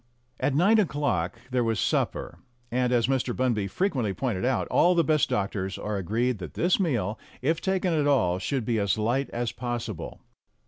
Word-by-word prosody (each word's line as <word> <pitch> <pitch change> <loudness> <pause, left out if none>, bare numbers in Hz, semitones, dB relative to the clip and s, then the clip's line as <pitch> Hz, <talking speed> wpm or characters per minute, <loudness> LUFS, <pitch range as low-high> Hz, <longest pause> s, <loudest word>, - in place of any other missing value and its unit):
At 140 - +1
nine 200 +8 +5
o'clock 140 - 0
there 125 -1 +2
was 115 -2 0
supper, - - -1 0.3
and, 125 0 +1
as 120 -2 +3
Mr. 130 -2 0
Bunby 120 -6 0
frequently 125 - -1
pointed 110 -4 -2
out, 130 +1 +1
all 180 +1 +4
the 170 - +4
best 155 -1 +2
doctors 100 -1 -2
are 105 -1 -3
agreed 110 +5 0
that 90 -5 -8
this 175 +3 +2
meal, 120 - 0 0.2
if 160 +4 +1
taken 190 -2 0
at 150 -2 +2
all, 90 -11 +2
should 120 +5 -2
be 115 -1 +1
as 100 +1 +1
light 120 +6 0
as 120 -1 -2
possible. 120 -6 -5
120 Hz, 180 wpm, -27 LUFS, 105-145 Hz, 0.3 s, nine